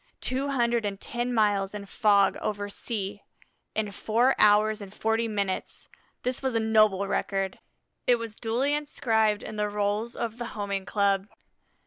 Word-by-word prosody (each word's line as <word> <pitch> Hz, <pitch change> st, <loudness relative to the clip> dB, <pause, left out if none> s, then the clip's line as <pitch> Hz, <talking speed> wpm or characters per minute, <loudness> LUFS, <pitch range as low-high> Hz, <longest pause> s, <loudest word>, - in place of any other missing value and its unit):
Two 265 Hz, +2 st, -1 dB
hundred 240 Hz, -3 st, +1 dB
and 200 Hz, -1 st, -3 dB
ten 240 Hz, +3 st, -3 dB
miles 205 Hz, -3 st, +1 dB
in 205 Hz, -1 st, -6 dB
fog 200 Hz, -1 st, +3 dB
over 205 Hz, -1 st, -2 dB
sea 205 Hz, -1 st, -4 dB, 0.5 s
in 215 Hz, -2 st, -1 dB
four 235 Hz, +6 st, +2 dB
hours 210 Hz, +1 st, +5 dB
and 200 Hz, -1 st, -8 dB
forty 225 Hz, +2 st, 0 dB
minutes! 200 Hz, -3 st, -3 dB, 0.3 s
This 250 Hz, 0 st, -2 dB
was 265 Hz, -3 st, -1 dB
a -, -, +3 dB
noble 215 Hz, -3 st, +3 dB
record. 195 Hz, -1 st, -1 dB, 0.5 s
It 245 Hz, -, +6 dB
was 230 Hz, -2 st, -5 dB
duly 245 Hz, +6 st, 0 dB
inscribed 225 Hz, -8 st, +1 dB
in 215 Hz, -, -7 dB
the 210 Hz, 0 st, 0 dB
rolls 210 Hz, +3 st, -1 dB
of 235 Hz, 0 st, -4 dB
the 240 Hz, -, -3 dB
Homing 200 Hz, -2 st, -3 dB
Club. 200 Hz, -1 st, +1 dB
215 Hz, 155 wpm, -27 LUFS, 200-235 Hz, 0.5 s, It